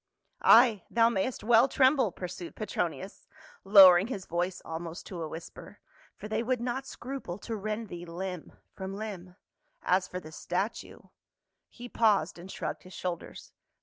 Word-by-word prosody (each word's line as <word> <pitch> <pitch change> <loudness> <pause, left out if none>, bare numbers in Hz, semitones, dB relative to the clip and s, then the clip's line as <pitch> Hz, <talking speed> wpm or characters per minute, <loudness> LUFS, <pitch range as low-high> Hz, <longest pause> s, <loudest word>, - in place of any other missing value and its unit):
"Ay, 235 - +6
thou 230 0 +4
mayst 235 +3 -2
well 235 +3 +5
tremble," 260 -5 +3
pursued 180 - -7
Petro - - -1
nius, - - -10 0.4
lowering 195 -1 +8
his 200 -7 -5
voice 175 +2 -2
almost 165 +1 -6
to 180 -3 -7
a 160 - -3
whisper, 160 +2 -10 0.4
"for - - -8
they 215 +1 -1
would 250 +1 0
not 255 +3 -3
scruple 255 -11 -6
to 225 +2 -5
rend 215 +2 -4
thee 175 -2 -8
limb 180 0 -6 0.2
from 190 0 -6
hmb; 190 -4 -7 0.5
as 185 0 +2
for 180 - -5
the 155 -3 -12
statue 190 +7 -4 0.2
— - - -61
" - - -56
He 245 0 -7
paused 205 -9 +1
and 180 +2 -10
shrugged - - -5
his 185 - -14
shoulders. 180 -2 -6
195 Hz, 165 wpm, -29 LUFS, 180-235 Hz, 0.5 s, lowering